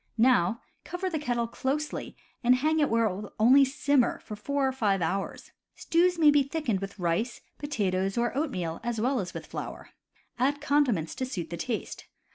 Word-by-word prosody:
Now 230 Hz, -3 st, +3 dB, 0.2 s
cover 370 Hz, +1 st, -4 dB
the 315 Hz, -, -1 dB
kettle 245 Hz, -5 st, -1 dB
closely 280 Hz, +6 st, -3 dB, 0.3 s
and 245 Hz, +1 st, +6 dB
hang 310 Hz, +5 st, +1 dB
it 295 Hz, -, +3 dB
where 230 Hz, 0 st, +3 dB
it 195 Hz, -4 st, 0 dB
will 205 Hz, +1 st, -8 dB
only 255 Hz, +6 st, +7 dB
simmer 275 Hz, -1 st, +2 dB
for 215 Hz, -, -7 dB
four 275 Hz, +6 st, -1 dB
or -, -, +1 dB
five 210 Hz, -7 st, +1 dB
hours. 185 Hz, +4 st, -3 dB, 0.2 s
Stews 350 Hz, +1 st, +2 dB
may 310 Hz, -3 st, +6 dB
be 290 Hz, -1 st, +5 dB
thickened 275 Hz, -7 st, -1 dB
with 195 Hz, +1 st, -7 dB
rice^ 180 Hz, +7 st, -1 dB, 0.2 s
potatoes, 195 Hz, -9 st, -1 dB
or 240 Hz, +1 st, 0 dB
oatmeal, 185 Hz, -, -2 dB
as 235 Hz, -2 st, -2 dB
well 255 Hz, +3 st, +1 dB
as 180 Hz, -4 st, -5 dB
with -, -, -6 dB
flour. -, -, -7 dB, 0.5 s
Add 280 Hz, +3 st, +2 dB
con 290 Hz, 0 st, +3 dB
diments 165 Hz, -9 st, -1 dB
to 260 Hz, -, -1 dB
suit 180 Hz, -, -5 dB
the -, -, -2 dB
taste. 225 Hz, +5 st, -4 dB
245 Hz, 190 wpm, -28 LUFS, 200-285 Hz, 0.5 s, only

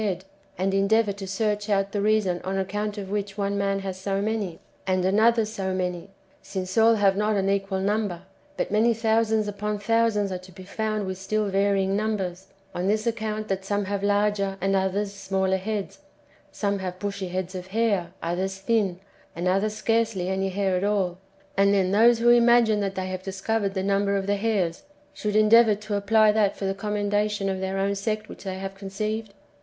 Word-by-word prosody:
head, 190 Hz, -3 st, -2 dB, 0.3 s
and 195 Hz, +1 st, 0 dB
endeavour 205 Hz, +2 st, +3 dB
to 195 Hz, 0 st, -7 dB
searcli 210 Hz, +2 st, -1 dB
out 195 Hz, -1 st, +1 dB
the 205 Hz, -, -1 dB
reason 205 Hz, -4 st, +1 dB
on 190 Hz, +1 st, -2 dB
account 205 Hz, +2 st, -2 dB
of 195 Hz, -1 st, -6 dB
which 205 Hz, -1 st, -3 dB
one 200 Hz, 0 st, -1 dB
man 195 Hz, 0 st, 0 dB
has 190 Hz, -1 st, -4 dB
so 195 Hz, 0 st, -1 dB
many, 205 Hz, -5 st, -2 dB, 0.3 s
and 185 Hz, -1 st, +1 dB
another 220 Hz, +4 st, +4 dB
so 195 Hz, -3 st, -3 dB
many, 180 Hz, 0 st, -3 dB, 0.3 s
since 185 Hz, -1 st, -5 dB
all 225 Hz, 0 st, +6 dB
have 200 Hz, -2 st, +3 dB
not 210 Hz, +1 st, +1 dB
an 195 Hz, -1 st, +1 dB
equal 195 Hz, -1 st, 0 dB
number, 200 Hz, -3 st, -1 dB, 0.3 s
but -, -, -2 dB
many 225 Hz, +2 st, +3 dB
thousands 220 Hz, -1 st, +1 dB
upon 210 Hz, +1 st, -3 dB
thousands 210 Hz, -1 st, +1 dB
are 185 Hz, -, -3 dB
to 185 Hz, +1 st, -14 dB
be 185 Hz, +1 st, -11 dB
found 215 Hz, +1 st, -2 dB
with 190 Hz, 0 st, -5 dB
still 215 Hz, +2 st, -1 dB
varying 195 Hz, 0 st, +1 dB
numbers, 195 Hz, -3 st, -2 dB, 0.3 s
on 180 Hz, +2 st, -2 dB
this 215 Hz, +2 st, +1 dB
account 215 Hz, -2 st, -2 dB
that 195 Hz, 0 st, -2 dB
some 205 Hz, +1 st, -1 dB
have 200 Hz, 0 st, -2 dB
larger 205 Hz, -1 st, +1 dB
and 195 Hz, 0 st, +1 dB
others 195 Hz, +1 st, 0 dB
smaller 190 Hz, -1 st, 0 dB
heads, 205 Hz, +1 st, -4 dB, 0.5 s
some 200 Hz, -1 st, -1 dB
liave 185 Hz, -1 st, -5 dB
bushy 200 Hz, -1 st, -4 dB
heads 185 Hz, +1 st, -4 dB
of 185 Hz, -1 st, -6 dB
hair, 200 Hz, -4 st, 0 dB
others 185 Hz, +3 st, -2 dB
thin, 195 Hz, -3 st, 0 dB, 0.4 s
and 175 Hz, +2 st, -2 dB
others 200 Hz, +3 st, +1 dB
scarcely 220 Hz, -4 st, 0 dB
any 190 Hz, 0 st, 0 dB
hair 190 Hz, 0 st, 0 dB
at 180 Hz, -, -1 dB
all, 195 Hz, -3 st, 0 dB, 0.2 s
— 195 Hz, 0 st, -32 dB
and 200 Hz, +1 st, +4 dB
then 190 Hz, -1 st, +2 dB
those 230 Hz, +4 st, +5 dB
who 235 Hz, +1 st, +3 dB
imagine 235 Hz, -2 st, +5 dB
that 195 Hz, -1 st, -2 dB
they 185 Hz, 0 st, -2 dB
have 185 Hz, 0 st, -4 dB
discovered 195 Hz, +2 st, -2 dB
the 190 Hz, -, -1 dB
number 200 Hz, 0 st, +1 dB
of 195 Hz, -, -2 dB
the 205 Hz, +1 st, +1 dB
hairs, 195 Hz, -6 st, 0 dB, 0.3 s
should 210 Hz, -1 st, -3 dB
endeavour 215 Hz, 0 st, +6 dB
to 210 Hz, +1 st, -6 dB
apply 210 Hz, +1 st, +4 dB
that 210 Hz, -2 st, +1 dB
for 195 Hz, -, -4 dB
the 195 Hz, -, 0 dB
commendation 205 Hz, 0 st, -1 dB
of 190 Hz, -1 st, -2 dB
their 190 Hz, 0 st, -2 dB
own 195 Hz, +1 st, +1 dB
sect 215 Hz, +2 st, -2 dB
which -, -, -11 dB
they 190 Hz, -1 st, -3 dB
have 195 Hz, 0 st, -5 dB
conceived 200 Hz, +2 st, -4 dB
200 Hz, 200 wpm, -25 LUFS, 190-215 Hz, 0.5 s, all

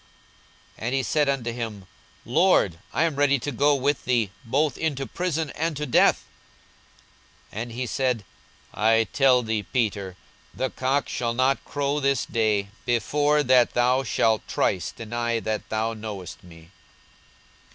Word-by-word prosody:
42:022:033 110 Hz, -, -4 dB
And 125 Hz, -, 0 dB
he 135 Hz, -, 0 dB
said 150 Hz, +2 st, +1 dB
unto 125 Hz, -4 st, -1 dB
him, 110 Hz, -5 st, -6 dB, 0.4 s
Lord, 120 Hz, -, +3 dB
I -, -, +1 dB
am 160 Hz, -4 st, 0 dB
ready 140 Hz, -1 st, +3 dB
to 145 Hz, +3 st, -4 dB
go 145 Hz, +3 st, +3 dB
with 140 Hz, +1 st, 0 dB
thee, 120 Hz, -6 st, +1 dB
both 140 Hz, +4 st, 0 dB
into 140 Hz, -4 st, -2 dB
prison, 165 Hz, -3 st, -2 dB
and 160 Hz, -1 st, -2 dB
to 150 Hz, -, -2 dB
death. 125 Hz, -, +3 dB, 1.3 s
42:022:034 105 Hz, -, -4 dB
And 120 Hz, 0 st, -6 dB
he 125 Hz, +2 st, -3 dB
said, 125 Hz, -4 st, -1 dB, 0.5 s
I 115 Hz, +1 st, +3 dB
tell 130 Hz, -3 st, +4 dB
thee, 110 Hz, -1 st, -1 dB
Peter, 100 Hz, -5 st, -2 dB, 0.4 s
the 130 Hz, -, -2 dB
cock 135 Hz, +2 st, 0 dB
shall 115 Hz, -1 st, -2 dB
not 130 Hz, +2 st, +1 dB
crow 145 Hz, 0 st, -1 dB
this 140 Hz, -2 st, +1 dB
day, 105 Hz, -3 st, 0 dB
before 145 Hz, +6 st, +1 dB
that 125 Hz, -2 st, +4 dB
thou 125 Hz, +2 st, +3 dB
shalt 110 Hz, -3 st, +1 dB
thrice 90 Hz, -4 st, 0 dB
deny 115 Hz, +1 st, -2 dB
that 110 Hz, -1 st, -4 dB
thou 110 Hz, +1 st, -1 dB
knowest 100 Hz, -5 st, -8 dB
me. 85 Hz, -1 st, -15 dB
125 Hz, 150 wpm, -25 LUFS, 110-140 Hz, 1.3 s, tell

